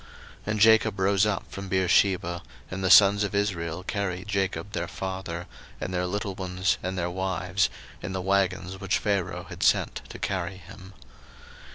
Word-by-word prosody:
01:046:005 - - -20 0.4
And 105 0 -1
Jacob 110 -1 +5
rose 100 +1 +3
up 105 - -2
from 100 -1 -7
Beersheba: 90 -1 +2 0.3
and 95 +1 -4
the 95 - +2
sons 100 +1 +7
of 100 0 -2
Israel 90 -4 -1
carried 95 -1 -3
Jacob 100 0 -1
their 85 -4 -2
father, 95 -2 -5 0.3
and 95 - -4
their 90 0 0
little 100 +1 -2
ones, 90 0 -1
and 95 +1 -3
their 85 -1 -1
wives, 95 0 0 0.3
in 90 - -5
the 95 - -2
wagons 95 -1 0
which 95 -1 +1
Pharaoh 100 -4 -1
had - - -8
sent - - +2
to - - -8
carry 95 -1 -3
him. 95 +1 -13
95 Hz, 170 wpm, -27 LUFS, 90-100 Hz, 0.4 s, sons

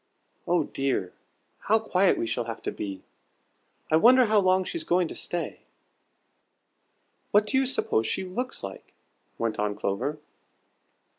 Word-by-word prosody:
Oh 175 -2 +3
dear, 135 -11 -2 0.5
how 220 - +3
quiet 195 -4 +2
we - - -1
shall 120 +1 -2
have 115 -1 -7
to - - -2
be! 95 -2 -6 0.9
I 155 - +6
wonder 250 +7 +6
how 215 -1 +4
long 185 -1 +3
she's 330 - -4
going 180 - +2
to - - -5
stay?" 175 -1 -3 1.7
"What 210 +1 +4
do 215 - -3
you 265 0 +3
suppose 115 - 0
she - - -1
looks 245 +8 -3
like?" 95 -1 -9 0.4
went 115 -2 -2
on 105 -1 0
Clover. 105 +9 -2
175 Hz, 145 wpm, -27 LUFS, -, 1.7 s, I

